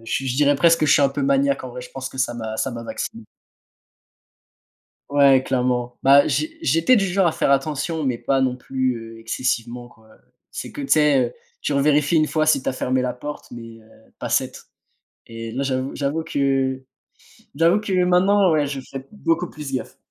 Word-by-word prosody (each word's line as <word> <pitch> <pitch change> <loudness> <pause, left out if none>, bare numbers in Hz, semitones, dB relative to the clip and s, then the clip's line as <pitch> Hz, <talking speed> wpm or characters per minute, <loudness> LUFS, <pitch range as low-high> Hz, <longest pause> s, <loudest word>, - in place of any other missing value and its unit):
je 135 +4 -2
je 125 - -2
dirais 145 0 +3
presque 165 +3 +4
que 155 - +2
je 145 - +5
suis 160 - +4
un 140 - +4
peu 140 +1 -4
maniaque 140 0 +1
en 130 - -7
vrai, 125 +1 -8
je 125 - -11
pense 135 -1 -6
que 130 - -12
ça 130 -2 0
m'a 110 -2 -5
ça 135 - -1
m'a 115 -1 -7
vacciné. 115 -1 -6 1.9
Ouais, 140 -2 +5
clairement. 125 -1 -1
Bah, 140 +1 +6
j'é 325 +1 -2
j'étais 210 - +3
du 200 -4 +2
genre 190 0 +2
à - - +2
faire 140 - 0
attention, 150 +3 -1
mais 125 -3 0
pas 135 +2 0
non 130 -1 +1
plus, 130 0 -2 0.2
heu, - - -13
excessivement, 120 +1 -3
quoi. 110 -1 -23 0.4
C'est - - -7
que 290 - -7
tu 275 - -5
sais, 150 -3 +4
heu, 120 - -12 0.3
tu 150 - -1
revérifies 145 +2 +2
1 155 -1 +4
fois 155 0 0
si 155 -4 +2
tu - - 0
as - - -3
fermé 130 0 -1
la 125 -1 -2
porte, 145 +4 -8
mais, 115 -1 -10
heu, 110 0 -23
pas - - -4
7 - - -1 0.6
et 115 0 -7
là, 140 +4 -3
j'avoue 130 0 -2
j'avoue 145 +3 -1
que 135 -2 -1 0.7
j'avoue 165 +6 +3
que 210 -2 -5
maintenant 185 +1 +3
ouais, 150 -2 +2
je 140 -1 -4
fais 135 0 -9
beaucoup 175 -3 -1
plus 150 -3 -8
gaffe. 130 - -4
135 Hz, 210 wpm, -22 LUFS, 125-155 Hz, 1.9 s, Bah